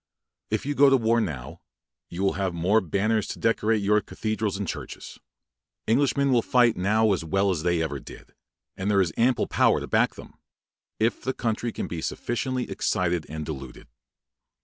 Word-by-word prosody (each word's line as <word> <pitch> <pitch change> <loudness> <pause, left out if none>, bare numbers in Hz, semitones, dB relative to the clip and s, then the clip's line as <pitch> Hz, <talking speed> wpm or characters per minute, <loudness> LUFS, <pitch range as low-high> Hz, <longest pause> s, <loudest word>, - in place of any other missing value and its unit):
If - - -1
you 145 - -1
go 145 0 +5
into 135 -1 +6
war 115 0 +2
now, 70 - -5 0.5
you 90 +3 -4
will 95 - +2
have 95 -2 -2
more 95 +6 +3
banners 100 +5 0
to - - -5
decorate 110 -1 +1
your 105 +1 +3
cathedrals 110 -2 -3
and 100 -2 -4
churches. - - -7 0.7
Englishmen 140 +3 +2
will 120 -2 +4
fight 120 -1 +3
now 105 +4 +2
as 90 - -2
well 95 +4 +1
as 85 -4 -2
they 85 -1 +1
ever 75 -3 -3
did; - - -13 0.4
and 95 +2 -2
there 100 -1 +3
is 85 -5 -1
ample 125 +2 +2
power - - +3
to - - -5
back - - +1
them, - - -13 0.6
if 115 +2 +1
the 130 - -2
country 115 0 -2
can - - -4
be 85 - -5
but 80 - -3
sufficiently 125 +1 -2
excited 85 -3 -1
and 80 0 -5
deluded. 65 -6 -8
105 Hz, 185 wpm, -25 LUFS, 85-115 Hz, 0.7 s, into